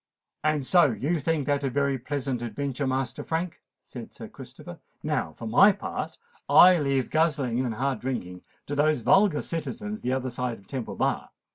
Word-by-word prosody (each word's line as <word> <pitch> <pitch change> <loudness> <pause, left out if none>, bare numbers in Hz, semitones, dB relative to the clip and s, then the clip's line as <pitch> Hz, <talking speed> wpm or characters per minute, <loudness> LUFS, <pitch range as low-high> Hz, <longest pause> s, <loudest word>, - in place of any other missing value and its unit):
"And 155 -3 +1
so 175 0 +5
you 135 +9 -1
think 150 -1 0
that 145 -1 0
a 135 - 0
very 140 0 0
pleasant 130 -1 -3
adventure, 135 +4 -3
Master 130 0 -2
Frank?" 165 +1 -3 0.2
said - - -10
Sir - - -8
Christopher. - - -11 0.2
"Now, 80 - -1
for 115 - -9
my 160 - +6
part, 200 - -5 0.3
I 180 -1 +8
leave 140 -3 0
guzzling 145 -6 +1
and 120 -4 -2
hard 135 0 -1
drinking 90 -9 -4 0.2
to 145 - -5
those 150 -2 +2
vulgar 190 - +4
citizens 210 +6 -5
the 125 - -1
other 130 -1 -2
side 120 -1 -3
of 100 - -20
Temple 125 +2 -5
Bar. - - -1
140 Hz, 175 wpm, -26 LUFS, 125-155 Hz, 0.3 s, I